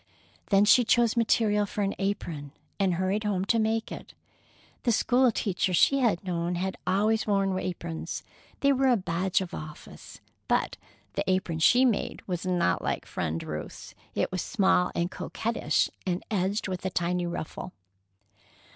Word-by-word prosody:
Then 200 0 +4
she 245 +4 +6
chose 235 -1 +3
material 215 -3 +2
for 205 0 -2
an 195 - 0
apron, 165 -8 -3 0.3
and 190 -3 +2
hurried 190 +4 0
home 195 -3 0
to 230 +3 +2
make 220 +1 0
it. - - -9 0.7
The 240 - +1
school 250 +2 +3
teachers 190 -4 0
she 275 +9 +4
had 225 -9 +1
known 175 -1 -2
had 190 +2 -2
always 215 +4 +2
worn 195 -2 +1
aprons. 170 -3 -5 0.4
They 280 0 +4
were 270 0 +2
a 245 -2 +4
badge 185 0 0
of 185 -1 -6
office. 155 -3 -9 0.3
But - - 0 0.4
the - - -1
apron 185 -3 0
she 245 +10 +5
made 235 -5 -1
was 180 -1 -3
not 180 -2 +1
like - - -2
Friend 80 -1 -3
Ruth's. 75 0 -7 0.2
It - - 0
was 185 -2 -2
small 190 -5 +2
and 170 +2 -1
coquettish, 230 +1 -1 0.2
and 180 0 -1
edged 200 +1 0
with 185 -1 -4
a 190 - 0
tiny 175 0 -1
ruffle. 170 +2 -5
190 Hz, 160 wpm, -27 LUFS, 175-220 Hz, 0.7 s, she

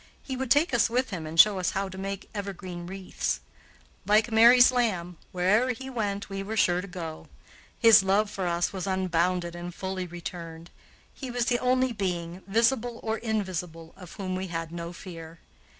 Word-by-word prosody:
He 265 - -4
would 260 -1 -3
take 290 +4 +4
us 235 -1 +3
with 250 +1 0
him 165 -5 -5
and 160 +1 -4
show 205 -1 +7
us 180 - 0
how 195 0 -1
to 190 - -9
make 195 +1 -5
evergreen 185 -4 -6
wreaths. 190 0 -3 0.7
Like 215 +3 +3
Mary's 240 +3 +7
lamb, 185 -9 -1
where'er 210 +8 +2
he 265 +2 -8
went 205 -4 -2
we 195 0 -5
were 215 +3 -4
sure 175 -3 +3
to 195 - -8
go. 165 -4 -7 0.5
His 225 -3 +7
love 195 +3 +2
for 190 -3 -3
us 170 +2 0
was 190 0 -4
unbounded 180 -2 0
and 175 0 -7
fully 190 -1 -4
returned. 170 -1 -8 0.4
He 265 - -7
was 245 -1 -1
the 245 -1 +1
only 255 0 +2
being, 180 -3 -3
visible 230 +3 +1
or 220 0 -2
invisible, 180 -7 -4
of 180 -3 -12
whom 185 -2 -4
we 185 +1 -3
had 165 -2 -4
no 170 0 -6
fear. 165 -2 -10
190 Hz, 180 wpm, -27 LUFS, 175-225 Hz, 0.7 s, show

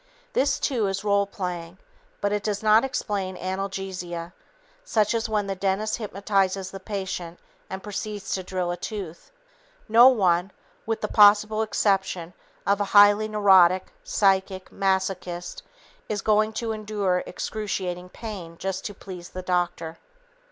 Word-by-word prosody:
This, 275 0 +2
too, 235 -7 0
is 195 +1 -3
role 200 -1 +2
playing, 180 -3 -5 0.4
but 205 - +1
it 210 - 0
does 205 0 -2
not 215 +1 +5
explain 200 -8 -2
analgesia, 185 -2 -4 0.5
such 215 - +1
as 230 0 -1
when 210 -2 0
the 195 - -2
dentist 195 +3 -1
hypnotizes 195 -3 -1
the 195 - -7
patient 190 -4 -5 0.3
and 190 0 -6
proceeds 210 -1 -4
to 190 - -1
drill 180 -1 -2
a 175 - -4
tooth. 190 -7 -7 0.6
No 235 +3 +8
one 185 -7 +3 0.4
(with 225 -1 -1
the 210 - -1
possible 210 +1 +5
exception 190 -5 0 0.3
of 200 +1 +2
a - - +1
highly 205 +1 +7
neurotic 190 -4 +4
psychic 190 -1 +1
masochist) 190 - -2 0.5
is 205 -2 -2
going 215 0 +2
to 230 0 -2
endure 205 -4 -1
excruciating 185 -4 -4
pain 185 -7 -8
just 190 +1 -3
to 205 - -5
please 180 -3 -9
the 185 - -7
doctor. 175 -2 -2
195 Hz, 140 wpm, -25 LUFS, 185-210 Hz, 0.6 s, No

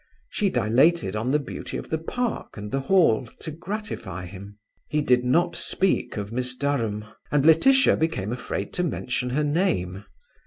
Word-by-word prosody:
She 205 - +1
dilated 140 - +2
on 110 +4 -1
the 145 - +4
beauty 140 -3 -6
of - - -8
the 160 - 0
park 240 - -3
and 105 0 -6
the 135 - 0
Hall 135 - +3
to 160 - -5
gratify 175 - -5
him. 100 +3 -10 0.3
He 150 0 +1
did 125 -2 +3
not 165 +8 +2
speak 190 -10 0
of 100 0 -4
Miss 125 +1 -2
Durham, 115 -7 -1 0.3
and 145 -1 +2
Laetitia 265 - +6
became 120 -10 -1
afraid 100 -5 -4
to 180 - 0
mention 125 -6 -2
her 145 +5 0
name. 145 - 0
135 Hz, 165 wpm, -25 LUFS, 110-165 Hz, 0.3 s, Laetitia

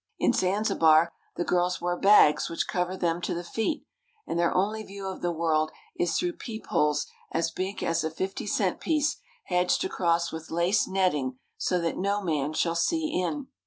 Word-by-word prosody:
In - - +2
Zanzibar 170 -4 +3 0.2
the 175 - -1
girls 180 +1 +1
wear 175 0 -1
bags 195 -5 +5
which 165 - -2
cover 180 0 -1
them 170 -1 0
to 175 - -2
the 175 - -4
feet, 225 - -2 0.4
and 170 - -2
their 170 - +3
only 210 +4 0
view 200 -1 -8
of 190 - -6
the 175 - 0
world 160 -2 +1 0.3
is 175 -1 0
through 355 -1 -1
peepholes 215 - -1 0.3
as 165 0 0
big 190 +4 -4
as 165 -1 +1
a 160 - 0
fifty 190 +6 -4
cent 195 -2 0
piece 305 -2 +1 0.3
hedged 180 - +1
across 170 - +1
with 160 0 -7
lace 170 +5 +2
netting 150 -10 0 0.2
so 180 - 0
that 170 -1 -2
no 200 +2 +1
man 155 -4 -1
shall 165 +1 +1
see 310 - +1
in. 260 +10 -2
180 Hz, 180 wpm, -27 LUFS, 165-200 Hz, 0.4 s, bags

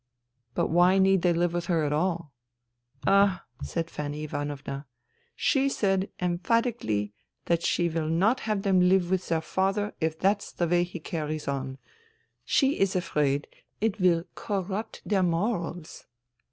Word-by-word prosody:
" 120 -1 -49
But - - +1
why 175 +3 +5
need 190 -1 +4
they 175 0 +3
live 170 0 +1
with 175 -1 -2
her 165 -3 +2
at 145 - 0
all? 170 -1 -1 0.4
" 120 0 -54 0.2
"Ah," 195 -1 +4 0.2
said 165 -1 -3
Fanny 150 0 -4
Ivanovna. 145 -1 -5 0.5
"She 275 -1 +2
said 195 -6 0
em 175 -1 0
phatically 220 - 0 0.3
that 170 -1 +1
she 170 0 +1
will 160 -1 -2
not 200 +10 +3
have 205 -2 0
them 190 -2 +3
live 185 -1 +3
with 190 -1 0
their 165 -1 +1
father 195 +5 0
if 160 0 0
that's 200 +4 +1
the 175 - 0
way 175 +1 +3
he 175 0 -8
carries 155 -1 -4
on. 135 -1 -3 0.7
She 275 0 +2
is 195 -1 +2
afraid 145 -5 0 0.3
it 215 -1 0
will 170 -2 +4
corrupt 200 +1 -4
their 200 -3 +2
morals." 175 -2 -2
175 Hz, 160 wpm, -27 LUFS, 155-195 Hz, 0.7 s, why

